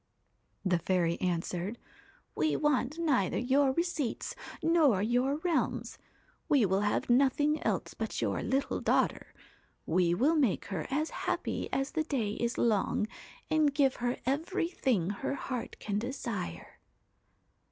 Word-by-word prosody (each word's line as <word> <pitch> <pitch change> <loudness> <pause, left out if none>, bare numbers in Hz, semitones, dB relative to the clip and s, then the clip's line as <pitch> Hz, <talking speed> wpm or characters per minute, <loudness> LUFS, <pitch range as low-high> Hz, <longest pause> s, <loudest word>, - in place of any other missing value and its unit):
'The 180 -2 +2
fairy 170 -1 0
answered: 180 +3 -2 0.6
"We 310 - +1
want 295 -1 +1
neither 275 - +1
your 270 +2 +3
receipts 320 -4 -2 0.3
nor 315 - +4
your 250 +5 +2
realms; 345 -3 -1 0.5
we 280 -8 +5
will 190 0 +2
have 205 0 0
nothing 280 +4 +3
else - - -1
but - - -4
your - - 0
little 270 +1 -1
daughter. - - +1 0.5
We 175 0 +2
will 275 - +3
make 265 - +2
her 165 -5 -3
as 300 +4 -1
happy - - -2
as 270 +1 -1
the 315 - 0
day 255 -9 -1
is 235 +3 -2
long, 210 -2 +2 0.4
and 305 -3 +2
give 275 -3 +3
her 245 +1 -1
every 330 +6 0
thing 220 - 0
her 270 +7 -3
heart 255 -3 -4
can 205 -1 -2
desire." 230 - -5
255 Hz, 135 wpm, -31 LUFS, 205-295 Hz, 0.6 s, we